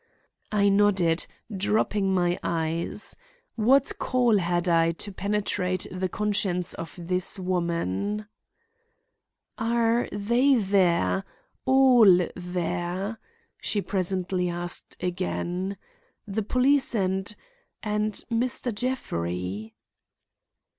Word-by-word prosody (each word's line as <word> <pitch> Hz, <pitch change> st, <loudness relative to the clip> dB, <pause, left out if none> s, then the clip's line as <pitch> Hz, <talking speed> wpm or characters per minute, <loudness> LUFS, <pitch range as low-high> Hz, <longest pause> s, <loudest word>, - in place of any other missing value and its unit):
I 205 Hz, -1 st, +3 dB
nodded, 195 Hz, -5 st, +3 dB, 0.3 s
dropping 200 Hz, 0 st, +1 dB
my 175 Hz, -1 st, +1 dB
eyes. 165 Hz, +4 st, -2 dB, 0.4 s
What 255 Hz, +5 st, +3 dB
call 245 Hz, -5 st, +3 dB
had 175 Hz, 0 st, 0 dB
I 165 Hz, -1 st, +3 dB
to 205 Hz, +5 st, -6 dB
penetrate 195 Hz, -2 st, -1 dB
the 185 Hz, 0 st, -2 dB
conscience 195 Hz, -4 st, 0 dB
of 165 Hz, -, -8 dB
this 180 Hz, +3 st, -1 dB
woman? 180 Hz, -, -1 dB, 1.3 s
"Are 230 Hz, +1 st, +1 dB
they 235 Hz, +7 st, +3 dB
there? 195 Hz, -3 st, +2 dB, 0.4 s
all 245 Hz, -9 st, +6 dB
there?" 180 Hz, +3 st, -3 dB, 0.4 s
she 210 Hz, -, 0 dB
presently 185 Hz, -1 st, -1 dB
asked 175 Hz, 0 st, -3 dB
again. 180 Hz, +1 st, -2 dB, 0.5 s
"The 210 Hz, +1 st, -2 dB
police 255 Hz, +4 st, +3 dB
and—and 210 Hz, -, -3 dB, 0.2 s
Mr. 240 Hz, +1 st, 0 dB
Jeffrey?" 100 Hz, -, -3 dB
195 Hz, 85 wpm, -26 LUFS, 175-215 Hz, 1.3 s, all